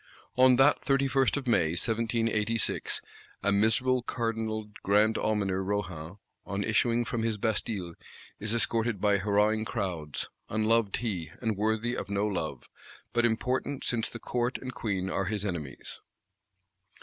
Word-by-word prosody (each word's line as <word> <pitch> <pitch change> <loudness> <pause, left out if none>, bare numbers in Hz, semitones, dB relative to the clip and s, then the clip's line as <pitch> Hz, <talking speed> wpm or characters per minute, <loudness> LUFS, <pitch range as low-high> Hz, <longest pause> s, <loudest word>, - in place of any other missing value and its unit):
On 130 0 +6
that 135 +3 +5
31st 135 -1 +2
of 140 - -4
May, 80 -9 +3
1786, 115 0 0 0.4
a 100 - +2
miserable 115 +5 +3
Cardinal 110 -3 -3
Grand 105 +3 +3
Almoner 100 -3 0
Rohan, 95 -3 -3 0.3
on 100 0 -3
issuing 115 +2 +2
from 115 - -2
his 110 -1 0
Bastille, 105 -4 -1 0.5
is 105 0 -2
escorted 115 -1 +1
by 100 0 +3
hurrahing 105 +2 +2
crowds: 85 -8 -3 0.2
unloved 110 -1 +2
he, 95 -10 -3
and 110 -3 -1
worthy 110 +4 0
of - - -4
no 100 0 0
love; 80 -10 -3 0.5
but 120 0 +3
important 125 +4 -1
since 115 -2 -1
the - - -7
Court 120 +2 -1
and 130 -1 -7
Queen 100 -6 -2
are 95 - 0
his 105 +1 -2
enemies. 85 -8 -5
110 Hz, 135 wpm, -29 LUFS, 100-120 Hz, 0.5 s, On